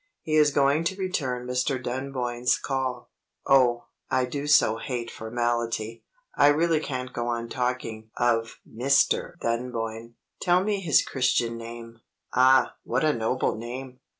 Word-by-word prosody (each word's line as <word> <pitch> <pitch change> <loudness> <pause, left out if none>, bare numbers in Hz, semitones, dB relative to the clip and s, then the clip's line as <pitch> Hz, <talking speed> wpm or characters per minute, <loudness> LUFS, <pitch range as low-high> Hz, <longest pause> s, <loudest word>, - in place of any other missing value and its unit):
He 155 - -3
is 150 -1 +5
going 140 +2 +2
to 190 - 0
return 135 -10 -2
Mr. 125 +2 0
Dunboyne's 125 -1 -1
call. 130 -3 -3 0.3
Oh, 125 -3 +4 0.3
I 130 -1 +2
do 140 +3 -4
so 130 -6 +4
hate 120 -1 -4
formality; 115 -1 -2 0.3
I - - +5
really 160 +2 +3
can't 130 -4 -5
go 120 0 -3
on 115 -1 -2
talking 125 -4 -3
of 115 -1 +1
Mr. 140 +8 +1
Dunboyne. 115 -1 -3 0.3
Tell 180 +1 +3
me 205 0 0
his 170 -6 +3
Christian 125 -3 0
name. 115 0 -9 0.3
Ah, 130 0 +4
what 130 +4 -1
a 155 -1 +3
noble 115 +2 0
name! 125 +3 -7
125 Hz, 140 wpm, -26 LUFS, 115-140 Hz, 0.3 s, is